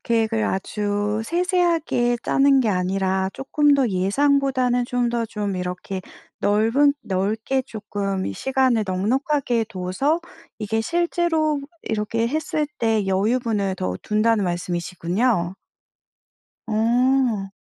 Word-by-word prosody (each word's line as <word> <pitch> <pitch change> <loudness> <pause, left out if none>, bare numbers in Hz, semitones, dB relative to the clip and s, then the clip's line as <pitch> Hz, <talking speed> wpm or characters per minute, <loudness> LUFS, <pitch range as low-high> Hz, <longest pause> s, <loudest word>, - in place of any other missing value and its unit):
계획을 225 -1 +1
아주 205 +2 -1
세세하게 340 -7 +1
짜는 275 0 +4
게 235 - +1
아니라 190 0 0
쪼끔 290 +2 +2
더 270 -3 +2
예상보다는 250 +5 +2
좀 245 -1 0
더 235 -1 -1
좀 210 -2 -3
이렇게 180 +1 -4 0.4
넓은 225 +8 +3
넓게 215 +7 -1
쪼끔 200 - -3
시간을 260 - +1
넉넉하게 240 +5 0
둬서 215 - -1 0.4
이게 220 +1 -1
실제로 330 0 0 0.2
이렇게 220 +1 -1
했을 305 +1 -1
때 220 -3 +1
여유분을 205 0 0
더 90 - -2
둔다는 215 0 +2
말씀이시군요. 175 +3 -1 1.1
어. 235 -1 +2
225 Hz, 240 characters per minute, -22 LUFS, 195-265 Hz, 1.1 s, 짜는